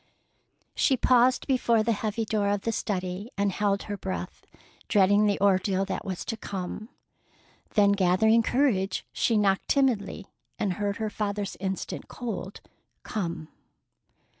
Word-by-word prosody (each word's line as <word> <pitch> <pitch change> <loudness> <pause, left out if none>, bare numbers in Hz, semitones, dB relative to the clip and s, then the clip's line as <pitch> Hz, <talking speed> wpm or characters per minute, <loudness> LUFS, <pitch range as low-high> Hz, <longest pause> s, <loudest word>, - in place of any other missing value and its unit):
She 265 - +2
paused 250 +1 +4
before 235 -4 +2
the 230 - +1
heavy 220 +1 -2
door 205 -2 0
of 205 -1 0
the 230 - -1
study 190 -1 -3
and 200 0 +1
held 200 0 0
her 205 -1 -5
breath, 190 0 -6 0.4
dreading 205 +1 +4
the 200 - +1
ordeal 195 -1 +2
that 190 - -4
was 185 -2 -5
to 225 - -3
come. 200 +1 -6 0.9
Then, 205 -2 +5
gathering 200 +4 +4
courage, 220 -7 +1
she 230 - +2
knocked 195 -2 +2
timidly, 225 -7 +1 0.3
and 195 -3 0
heard 205 +1 -2
her 220 -1 -3
father's 205 -1 -3
instant, 190 0 -4
cold 215 -5 -6 0.4
"Come." 170 -6 -4
205 Hz, 140 wpm, -27 LUFS, 195-220 Hz, 0.9 s, Then